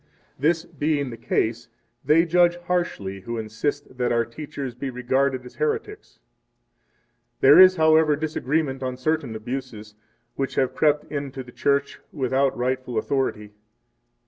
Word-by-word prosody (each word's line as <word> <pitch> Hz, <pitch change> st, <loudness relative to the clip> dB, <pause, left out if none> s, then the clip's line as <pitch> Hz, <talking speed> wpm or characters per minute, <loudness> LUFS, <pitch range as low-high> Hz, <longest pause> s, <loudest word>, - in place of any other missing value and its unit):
This 160 Hz, +4 st, +1 dB
being 145 Hz, -3 st, -1 dB
the -, -, -6 dB
case, 115 Hz, +1 st, -1 dB, 0.3 s
they 155 Hz, +5 st, +4 dB
judge 175 Hz, +1 st, +3 dB
harshly 175 Hz, -, -3 dB
who 115 Hz, +5 st, -5 dB
insist 125 Hz, +5 st, -4 dB
that 125 Hz, -, +1 dB
our 115 Hz, 0 st, +2 dB
teachers 135 Hz, +1 st, -7 dB
be 135 Hz, +3 st, -5 dB
regarded 130 Hz, +1 st, 0 dB
as 125 Hz, -, -13 dB
heretics. 440 Hz, -2 st, -3 dB
6 -, -, -34 dB, 1.2 s
There -, -, +8 dB
is, 185 Hz, 0 st, +9 dB
however, 160 Hz, -2 st, +4 dB
disagreement 150 Hz, -2 st, -2 dB
on 130 Hz, -1 st, -3 dB
certain 140 Hz, -3 st, -1 dB
abuses, 110 Hz, -2 st, -6 dB, 0.4 s
which 135 Hz, -1 st, -3 dB
have 130 Hz, -2 st, +1 dB
crept 150 Hz, -1 st, +2 dB
into 140 Hz, -3 st, -4 dB
the 125 Hz, -, -14 dB
Church 140 Hz, +1 st, 0 dB
without 135 Hz, -1 st, 0 dB
rightful 130 Hz, 0 st, -2 dB
authority. 110 Hz, -6 st, -1 dB
135 Hz, 140 wpm, -24 LUFS, 125-155 Hz, 1.2 s, is